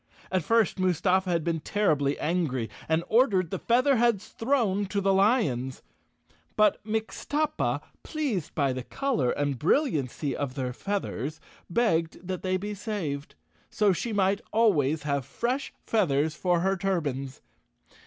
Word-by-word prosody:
At 185 Hz, -1 st, +2 dB
first 225 Hz, 0 st, +2 dB
Mustafa 185 Hz, +1 st, +2 dB
had 170 Hz, -2 st, +1 dB
been 165 Hz, -1 st, -1 dB
terribly 150 Hz, -6 st, +1 dB
angry 145 Hz, -, -1 dB, 0.2 s
and 160 Hz, +1 st, +2 dB
ordered 205 Hz, -, +3 dB
the -, -, -2 dB
Featherheads 235 Hz, -4 st, +2 dB
thrown 225 Hz, -6 st, +1 dB
to 200 Hz, +2 st, -1 dB
the 195 Hz, 0 st, +2 dB
lions. 175 Hz, -, +1 dB, 0.7 s
But 210 Hz, -2 st, +3 dB
Mixtuppa, 225 Hz, +8 st, -1 dB, 0.2 s
pleased 260 Hz, -, -3 dB
by 140 Hz, -4 st, +1 dB
the 130 Hz, -, -4 dB
color 240 Hz, -, -1 dB
and 140 Hz, -2 st, -1 dB
bril¬ 275 Hz, -, +3 dB
liancy 140 Hz, 0 st, -2 dB
of 135 Hz, -2 st, -3 dB
their 130 Hz, -3 st, -2 dB
feathers, 155 Hz, -, -3 dB, 0.3 s
begged 170 Hz, -4 st, 0 dB
that 185 Hz, -2 st, -3 dB
they 185 Hz, 0 st, 0 dB
be 205 Hz, +2 st, -4 dB
saved, 190 Hz, -9 st, -4 dB, 0.3 s
so 210 Hz, -3 st, +3 dB
she 230 Hz, +6 st, -3 dB
might 200 Hz, -1 st, +2 dB
always 160 Hz, -, +2 dB
have 140 Hz, -2 st, 0 dB
fresh 245 Hz, -, -2 dB
feathers 155 Hz, -8 st, +1 dB
for 175 Hz, +1 st, +1 dB
her 190 Hz, +2 st, +2 dB
turbans. 145 Hz, -9 st, -2 dB
185 Hz, 140 wpm, -27 LUFS, 145-215 Hz, 0.7 s, ordered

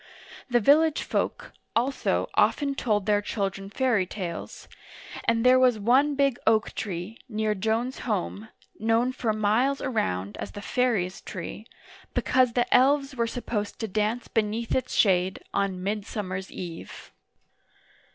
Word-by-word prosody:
The 240 Hz, -1 st, +4 dB
village 305 Hz, +7 st, +4 dB
folk, -, -, -2 dB, 0.2 s
also, 255 Hz, +4 st, +1 dB
often 285 Hz, -2 st, +2 dB
told 210 Hz, -7 st, 0 dB
their 205 Hz, -1 st, +3 dB
children 195 Hz, -2 st, -3 dB
fairy 220 Hz, -4 st, +1 dB
tales, 175 Hz, -4 st, -6 dB, 0.6 s
and 230 Hz, +1 st, +2 dB
there 255 Hz, +1 st, +7 dB
was 250 Hz, -3 st, +4 dB
one 260 Hz, +7 st, +3 dB
big 275 Hz, -3 st, +2 dB
oak 220 Hz, 0 st, +3 dB
tree, 190 Hz, +2 st, -5 dB
near 215 Hz, -1 st, 0 dB
Joan's 225 Hz, +5 st, -1 dB
home, 215 Hz, -1 st, -3 dB, 0.3 s
known 225 Hz, +3 st, +2 dB
for 235 Hz, -3 st, -1 dB
miles 220 Hz, +6 st, +1 dB
around 100 Hz, -, -2 dB
as -, -, -6 dB
the 205 Hz, -, -7 dB
fairies' 210 Hz, -8 st, 0 dB
tree, 195 Hz, +4 st, -7 dB, 0.5 s
be -, -, +2 dB
cause 255 Hz, -2 st, +3 dB
the 240 Hz, 0 st, +2 dB
elves 275 Hz, +1 st, +3 dB
were 235 Hz, -2 st, 0 dB
supposed 225 Hz, -3 st, -3 dB
to 225 Hz, -, -3 dB
dance 215 Hz, +4 st, -1 dB
beneath 225 Hz, +1 st, -1 dB
its 255 Hz, -1 st, -1 dB
shade, 185 Hz, -2 st, +2 dB
on 190 Hz, -2 st, -1 dB
Midsummer's 200 Hz, -2 st, -4 dB
Eve. 170 Hz, -3 st, -8 dB
220 Hz, 140 wpm, -26 LUFS, 200-250 Hz, 0.6 s, there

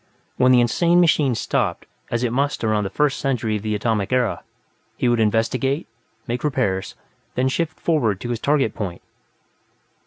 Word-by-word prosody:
When 130 Hz, 0 st, +4 dB
this 125 Hz, -, +6 dB
insane 170 Hz, +9 st, +3 dB
machine 150 Hz, -7 st, +3 dB
stopped, -, -, -1 dB, 0.2 s
as 120 Hz, +1 st, -1 dB
it 120 Hz, -1 st, 0 dB
must 140 Hz, +1 st, 0 dB
around 110 Hz, -2 st, +1 dB
the -, -, -2 dB
First 150 Hz, +6 st, 0 dB
Century 115 Hz, -6 st, -1 dB
of -, -, -8 dB
the 105 Hz, 0 st, -2 dB
Atomic 105 Hz, -1 st, -1 dB
Era, 125 Hz, -3 st, +1 dB, 0.6 s
he -, -, +1 dB
would 120 Hz, -1 st, +2 dB
investigate, 120 Hz, +7 st, +1 dB, 0.4 s
make 120 Hz, +1 st, -3 dB
repairs, 115 Hz, -10 st, -1 dB, 0.4 s
then 130 Hz, +1 st, +1 dB
shift 160 Hz, +5 st, -2 dB
forward 120 Hz, -, +1 dB
to 120 Hz, -, -5 dB
his 120 Hz, -2 st, -2 dB
target 140 Hz, -6 st, +1 dB
point. 90 Hz, -5 st, -5 dB
120 Hz, 165 wpm, -22 LUFS, 110-140 Hz, 0.6 s, this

